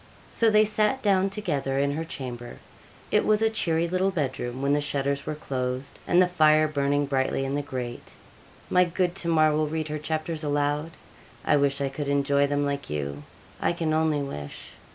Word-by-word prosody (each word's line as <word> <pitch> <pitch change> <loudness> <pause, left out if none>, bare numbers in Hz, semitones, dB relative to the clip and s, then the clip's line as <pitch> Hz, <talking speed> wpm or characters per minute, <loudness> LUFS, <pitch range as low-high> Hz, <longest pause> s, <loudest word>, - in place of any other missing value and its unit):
So 230 - +3
they 215 0 +5
sat 215 +5 +1
down 195 -2 +3
together 150 -10 -2
in 140 +1 +2
her 155 +3 -2
chamber. 125 -6 -7 0.5
It - - +3
was 215 +1 +2
a 220 - +3
cheery 170 -6 0
little 185 +2 +1
bed 150 -9 -2
room, 120 +1 -4
when 140 +1 +1
the 145 - +2
shutters 140 -1 -1
were 155 - -2
closed, 130 -2 -4
and 175 - +4
the 185 - +6
fire 155 -3 +4
burning 145 -1 +1
brightly 135 -1 0
in 135 - -2
the 145 - 0
grate. 125 -4 -6 0.6
'My 180 - +5
good 175 0 0
Tamar 165 -4 +2
will 155 0 +1
read 155 0 -3
her 150 0 -3
chapters 155 +1 -3
aloud. 145 +1 0 0.6
I - - +4
wish 140 0 +1
I 140 - 0
could 140 +1 -5
enjoy 140 0 +2
them 145 0 0
like 140 0 -3
you. 70 -1 -4 0.4
I - - +2
can 165 -2 -1
only 155 -2 +1
wish. 75 - -7
145 Hz, 195 wpm, -26 LUFS, 140-170 Hz, 0.6 s, the